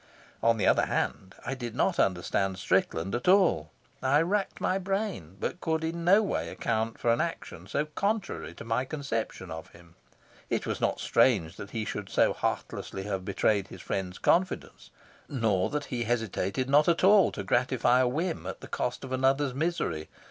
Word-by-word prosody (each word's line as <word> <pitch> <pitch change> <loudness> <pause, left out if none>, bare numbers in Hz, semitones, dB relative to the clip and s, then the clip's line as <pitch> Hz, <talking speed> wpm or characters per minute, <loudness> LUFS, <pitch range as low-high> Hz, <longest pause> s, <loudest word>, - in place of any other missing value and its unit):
On 115 0 +3
the 100 - 0
other - - +4
hand, 95 -1 -2
I - - -2
did 120 -3 -6
not 185 +7 +1
understand 95 +1 +1
Strickland 95 -2 0
at 120 +5 -2
all. 180 - +4 0.3
I 135 +3 +4
racked 195 +3 -1
my 185 +1 +1
brain, 190 - -3
but 180 - -3
could 160 -1 0
in 165 +1 -3
no 195 +5 +6
way 200 - -2
account 110 0 -2
for 115 - +3
an 120 - +1
action 125 - -5
so 145 +9 0
contrary 200 +6 -2
to - - -9
my 115 +2 0
conception 130 - -4
of 80 0 -7
him. 85 0 -17 0.6
It - - -1
was - - -3
not - - +1
strange 95 -11 +2
that 100 - -8
he 110 -1 -3
should 105 -2 -5
so - - +3
heartlessly 95 - -3
have 95 -2 -3
betrayed 100 +1 +1
his - - -11
friends' 95 -1 -3
confidence, 185 +1 0 0.4
nor 110 -8 +1
that 150 -1 -2
he 120 -1 -1
hesitated 115 0 -1
not 145 +2 +5
at 170 - +2
all 200 0 +6
to 100 - -4
gratify 125 +3 +2
a 130 - +4
whim 160 +6 -2
at - - -6
the - - -9
cost - - -3
of 130 - -7
another's 135 +1 +2
misery. 135 - -2
125 Hz, 185 wpm, -29 LUFS, 100-160 Hz, 0.6 s, no